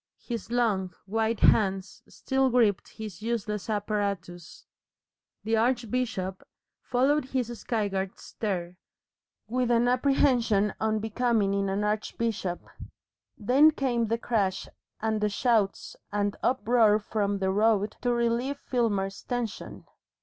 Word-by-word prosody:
His 235 Hz, -3 st, -5 dB
long, 205 Hz, -7 st, 0 dB
white 220 Hz, +2 st, -1 dB
hands 190 Hz, -2 st, +2 dB
still 265 Hz, 0 st, 0 dB
gripped 230 Hz, -6 st, +2 dB
his 210 Hz, -4 st, -8 dB
useless 220 Hz, -2 st, -3 dB
apparatus. 200 Hz, -5 st, -3 dB, 0.8 s
The 225 Hz, +1 st, +1 dB
archbishop 230 Hz, -5 st, -1 dB, 0.4 s
followed 270 Hz, +4 st, +1 dB
his 250 Hz, -3 st, -2 dB
skyward 195 Hz, -4 st, -2 dB
stare 180 Hz, -4 st, -4 dB, 0.7 s
with 250 Hz, +2 st, 0 dB
an 240 Hz, 0 st, +3 dB
apprehension 245 Hz, -5 st, +2 dB
unbecoming 220 Hz, -1 st, +1 dB
in 200 Hz, 0 st, 0 dB
an 195 Hz, +2 st, -1 dB
archbishop. 210 Hz, -3 st, -2 dB, 0.7 s
Then 260 Hz, +7 st, +5 dB
came 250 Hz, -6 st, 0 dB
the 230 Hz, +2 st, 0 dB
crash 205 Hz, -5 st, -1 dB, 0.3 s
and 220 Hz, -1 st, 0 dB
the 210 Hz, -, +2 dB
shouts 215 Hz, -2 st, 0 dB, 0.2 s
and 205 Hz, 0 st, 0 dB
uproar 235 Hz, -3 st, +3 dB
from 205 Hz, -1 st, -1 dB
the 190 Hz, -1 st, 0 dB
road 210 Hz, 0 st, +2 dB
to 245 Hz, -, +1 dB
relieve 240 Hz, +3 st, 0 dB
Filmer's 205 Hz, -8 st, -1 dB
tension. 245 Hz, -4 st, -5 dB
220 Hz, 115 wpm, -27 LUFS, 200-240 Hz, 0.8 s, Then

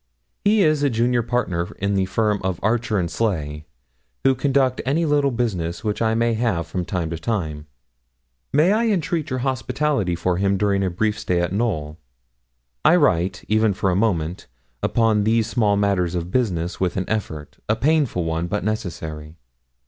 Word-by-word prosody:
He 205 Hz, 0 st, +4 dB
is 155 Hz, -3 st, +2 dB
the 145 Hz, -, +3 dB
junior 120 Hz, +1 st, +1 dB
partner 115 Hz, -8 st, -1 dB
in 100 Hz, +1 st, -1 dB
the 95 Hz, -1 st, +1 dB
firm 105 Hz, +1 st, 0 dB
of 95 Hz, -2 st, -2 dB
Archer 110 Hz, 0 st, +1 dB
and 90 Hz, -2 st, 0 dB
Sleigh, 80 Hz, -6 st, -2 dB, 0.6 s
who 135 Hz, -, +5 dB
conduct 130 Hz, -1 st, +1 dB
any 155 Hz, +6 st, +1 dB
little 145 Hz, -2 st, +2 dB
business 105 Hz, -8 st, -2 dB
which 105 Hz, 0 st, -2 dB
I 110 Hz, 0 st, +2 dB
may 115 Hz, 0 st, +2 dB
have 110 Hz, -8 st, 0 dB
from 90 Hz, +2 st, -4 dB
time 85 Hz, -2 st, -2 dB
to 80 Hz, -, -4 dB
time; 80 Hz, -7 st, -3 dB, 0.8 s
may 155 Hz, +6 st, +4 dB
I 225 Hz, +2 st, +2 dB
entreat 170 Hz, -6 st, 0 dB
your 130 Hz, -, -1 dB
hospitality 130 Hz, -5 st, 0 dB
for 90 Hz, +1 st, 0 dB
him 100 Hz, +1 st, +1 dB
during 100 Hz, 0 st, +1 dB
a 95 Hz, -, +1 dB
brief 105 Hz, +4 st, -1 dB
stay 90 Hz, -1 st, 0 dB
at 85 Hz, +1 st, -1 dB
Knowl? 85 Hz, -9 st, -2 dB, 0.8 s
I 155 Hz, +3 st, +6 dB
write, 95 Hz, -, +1 dB
even 110 Hz, -2 st, +2 dB
for 95 Hz, -1 st, +1 dB
a -, -, +1 dB
moment, 90 Hz, -5 st, -1 dB, 0.3 s
upon 110 Hz, -2 st, +2 dB
these 110 Hz, +1 st, +2 dB
small 110 Hz, -3 st, +1 dB
matters 95 Hz, -4 st, +1 dB
of 85 Hz, +1 st, -3 dB
business 90 Hz, -9 st, -1 dB
with 90 Hz, -1 st, -1 dB
an 95 Hz, -, -2 dB
effort 80 Hz, -9 st, -4 dB
a 110 Hz, -, +3 dB
painful 140 Hz, -, +1 dB
one, 80 Hz, +1 st, -2 dB
but 105 Hz, +4 st, -2 dB
necessary. 80 Hz, -7 st, -4 dB
105 Hz, 175 wpm, -22 LUFS, 90-120 Hz, 0.8 s, I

